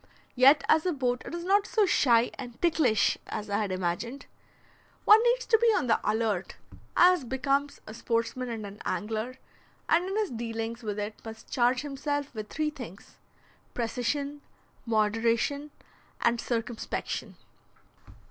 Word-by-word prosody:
Yet 275 +3 +6
as 315 +3 +4
a 360 - +1
boat 250 -3 -1
it - - -5
is 340 - -5
not 400 +3 +3
so 430 -2 +3
shy 240 -9 +3
and 245 -3 -9
"ticklish" 305 -11 +2
as 210 -1 -5
I 200 - +1
had 205 -3 -1
imagined. 185 +9 -3 0.8
One 425 +1 +8
needs - - +2
to 450 - +4
be 470 - +3
on 290 - +1
the 230 - +2
alert, 210 -3 -1 0.4
as 360 -3 +6
becomes 275 +3 -1
a 215 - -9
sportsman 235 +2 -2
and 225 -3 -5
an 200 +1 -10
angler, 220 +4 -3 0.5
and 350 +3 +2
in 390 - -2
his 430 -3 0
dealings 230 0 -4
with 210 -3 -4
it 210 +1 -5
must 225 0 -10
charge 250 +1 +2
himself 290 0 -3
with 215 -2 -6
three 305 -1 -1
things, 230 - -11 0.6
precision, 280 +5 -2 0.5
moderation, 230 +6 +1 0.5
and 235 0 +1
circumspection. 230 -1 -3
245 Hz, 145 wpm, -28 LUFS, 225-290 Hz, 0.8 s, One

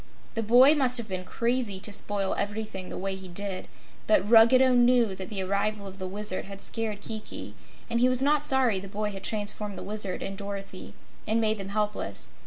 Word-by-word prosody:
The 225 - -2
boy 245 +6 +7
must 260 -4 +2
have 235 -2 -3
been 185 -2 -4
crazy 235 -4 -1
to 210 - -2
spoil 200 -1 0
everything 205 -2 -4
the - - -6
way 195 +1 -2
he 190 0 -8
did, 190 +1 -4 0.4
but 315 -9 +3
Ruggedo 245 +3 +6
knew 240 -3 +4
that 190 0 -7
the 195 -3 -2
arrival 200 +2 -1
of 195 0 -10
the 185 - -4
Wizard 200 0 -3
had 195 0 -9
scared 215 -1 -2
Kiki, 220 -1 -6 0.3
and 235 - 0
he 250 +1 +4
was 255 -1 +4
not 295 +1 +2
sorry 260 -8 +4
the 195 - -9
boy 210 +1 -3
had 195 -1 -8
transformed 210 -1 -3
the - - -6
Wizard 205 -2 -3
and 195 - -5
Dorothy 195 -1 -7 0.3
and 220 +1 +2
made 220 -1 +1
them 195 0 -6
helpless. 210 0 -3
210 Hz, 200 wpm, -27 LUFS, 195-235 Hz, 0.4 s, boy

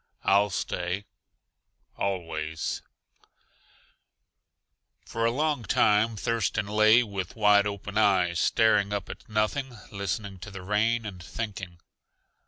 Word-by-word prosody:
"I'll 100 +1 +4
STAY 90 +1 -3 0.9
ALWAYS" 80 -5 -3 2.2
For 115 0 -2
a - - +4
long 150 +1 0
time 105 +2 +3
Thurston 110 -1 -1
lay 110 +3 +5
with 100 -5 -5
wide 105 -2 +5
open 100 +1 -3
eyes 90 -5 +3
staring 105 -3 +3
up 100 - -3
at - - -12
nothing, 120 +4 -1
listening 100 0 -4
to 100 - -8
the 95 -2 -9
rain 110 +4 +1
and 95 -4 -7
thinking. 95 -2 -6
105 Hz, 110 wpm, -27 LUFS, 95-110 Hz, 2.2 s, lay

